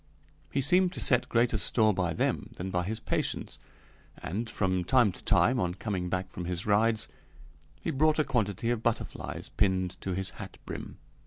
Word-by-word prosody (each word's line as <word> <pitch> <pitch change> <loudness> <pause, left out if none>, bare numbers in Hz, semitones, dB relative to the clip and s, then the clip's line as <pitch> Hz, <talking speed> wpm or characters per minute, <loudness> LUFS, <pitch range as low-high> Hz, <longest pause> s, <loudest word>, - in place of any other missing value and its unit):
He 140 - +1
seemed 180 +5 +4
to - - -6
set 125 -2 +3
greater 115 -2 +2
store 110 +2 +3
by 90 -3 0
them - - -1
than 95 +2 -5
by 90 -1 0
his 110 +3 -3
patients, - - -2 0.6
and, 110 +7 -4
from 95 -2 0
time 120 +2 +4
to - - -14
time, 125 0 +4
on 90 -3 -1
coming 95 -3 -3
back 95 +1 -2
from 90 - -6
his 90 +1 -2
rides, 110 +1 +2 0.7
he - - -1
brought 155 +2 +3
a 155 - +4
quantity 115 -4 0
of 120 -2 -1
butterflies 115 -1 -3
pinned 95 -3 +1
to 95 -2 -2
his 95 0 -2
hat - - -9
brim. - - -7
105 Hz, 180 wpm, -29 LUFS, 90-120 Hz, 0.7 s, seemed